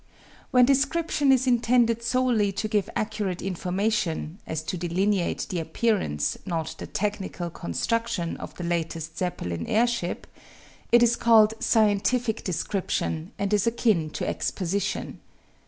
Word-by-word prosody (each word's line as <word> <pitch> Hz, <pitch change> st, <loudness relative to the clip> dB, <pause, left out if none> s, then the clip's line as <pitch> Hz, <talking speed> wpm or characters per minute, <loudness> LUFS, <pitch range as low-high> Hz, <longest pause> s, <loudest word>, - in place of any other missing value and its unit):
When 250 Hz, -1 st, +6 dB
description 285 Hz, +2 st, +2 dB
is 260 Hz, -1 st, +3 dB
intended 235 Hz, -1 st, +3 dB
solely 235 Hz, -4 st, +2 dB
to 215 Hz, -, -2 dB
give 210 Hz, -2 st, 0 dB
accurate 210 Hz, -4 st, -2 dB
information 185 Hz, -2 st, -1 dB
as 160 Hz, 0 st, -3 dB
to 165 Hz, -, -3 dB
delineate 180 Hz, +2 st, 0 dB
the 180 Hz, -, -2 dB
appearance, 160 Hz, -, 0 dB
not 165 Hz, -5 st, -3 dB
the -, -, -6 dB
technical 195 Hz, -4 st, -3 dB
construction, 180 Hz, -, -2 dB
of -, -, -9 dB
the 180 Hz, -, -6 dB
latest 165 Hz, -2 st, -3 dB
Zeppelin 90 Hz, -, -3 dB
airship 235 Hz, -5 st, 0 dB, 0.7 s
it 240 Hz, 0 st, +7 dB
is 235 Hz, 0 st, +4 dB
called 220 Hz, -2 st, +5 dB
"scientific 220 Hz, +2 st, +2 dB
description," 180 Hz, -2 st, -2 dB
and 200 Hz, +1 st, -1 dB
is 205 Hz, +1 st, +2 dB
akin 220 Hz, -9 st, +2 dB
to -, -, -3 dB
exposition. 195 Hz, +2 st, -2 dB
205 Hz, 125 wpm, -26 LUFS, 175-230 Hz, 0.7 s, it